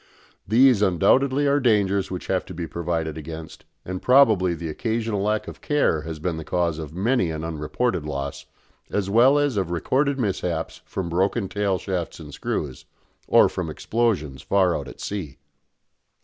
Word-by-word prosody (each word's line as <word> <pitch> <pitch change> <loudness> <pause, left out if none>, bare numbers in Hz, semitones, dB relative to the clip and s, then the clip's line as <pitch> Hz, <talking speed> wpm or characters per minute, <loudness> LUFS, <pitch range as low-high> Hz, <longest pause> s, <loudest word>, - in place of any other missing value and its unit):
These 120 +1 +5
undoubtedly 130 - +3
are 140 0 +3
dangers 100 -6 +2
which 90 - -5
have 95 -1 0
to 90 - -9
be 85 0 -3
provided 80 -1 -3
against, 80 +1 -9 0.2
and 95 0 -5
probably 110 -10 +4
the 85 0 -6
occasional 110 +4 -2
lack 105 +1 0
of - - -9
care 145 - +1
has 80 0 -6
been 80 +1 -3
the 80 - -5
cause 85 0 -1
of 75 -2 -6
many 100 -1 +1
an 80 0 -4
unreported 80 +5 -2
loss, 70 -2 -5 0.4
as 100 -1 -1
well 125 +6 +6
as 145 -6 +1
of 95 -4 0
recorded 135 - 0
mishaps 90 -8 -2
from 95 -3 -4
broken 95 +5 0
tail 100 -1 0
shafts 90 -4 -4
and 75 -2 -10
screws, 70 -1 -4 0.4
or - - +6
from - - -4
explosions 95 - -1
far 95 -3 +2
out - - -4
at - - -11
sea. 95 -9 -5
95 Hz, 165 wpm, -24 LUFS, 80-115 Hz, 0.4 s, well